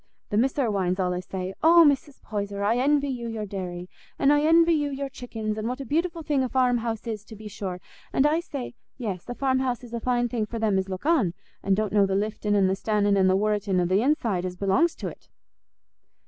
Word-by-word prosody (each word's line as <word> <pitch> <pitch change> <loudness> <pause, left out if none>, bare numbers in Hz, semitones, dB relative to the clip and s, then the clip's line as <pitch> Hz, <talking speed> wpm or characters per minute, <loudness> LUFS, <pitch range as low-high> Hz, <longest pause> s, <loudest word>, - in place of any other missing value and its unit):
The 205 - +1
Miss 255 +4 +2
Irwines 200 -9 0
allays 180 -1 -2
say, 185 0 -4
'Oh, 335 +1 +7
Mrs. 280 0 -1
Poyser, 200 -1 -4
I 220 +4 +2
envy 285 +2 +2
you 240 -3 -4
your 225 -2 -4
dairy; 180 -3 -6 0.3
and 280 +1 +4
I 290 - +3
envy 330 +2 +5
you 295 -2 0
your 275 0 -4
chickens; 220 -4 -5
and 215 - -3
what 250 +3 -3
a 275 - -5
beautiful 330 +4 -1
thing 290 -3 +1
a 260 - -1
farm 250 -2 +2
house 225 -1 -4
is, 220 -3 -4
to 220 - -11
be 215 +1 -10
sure!' 190 -3 -5 0.3
An' 265 - +2
I 305 +2 +3
say, 280 -8 -6 0.2
'Yes; 205 -5 -5
a 245 - -4
farm 260 -1 +1
house 255 -1 -2
is 240 -1 -11
a 235 - -2
fine 245 0 +1
thing 225 -3 -2
for 230 - -5
them 215 -4 +1
as 190 0 -3
look 185 +6 -6
on, 265 - +2 0.3
an' 195 0 +2
don't 210 -1 -1
know 200 -2 +4
the 190 - -1
liftin', 210 0 -1
an' 200 -1 +4
the 190 - +2
stannin', 205 0 +1
an' 190 -1 +4
the 185 - +4
worritin' 205 -2 0
o' 175 - +2
th' 185 +3 +2
inside 230 -8 +1
as 180 -1 -4
belongs 200 - +2
to't. - - -8
225 Hz, 235 wpm, -25 LUFS, 195-270 Hz, 0.3 s, Oh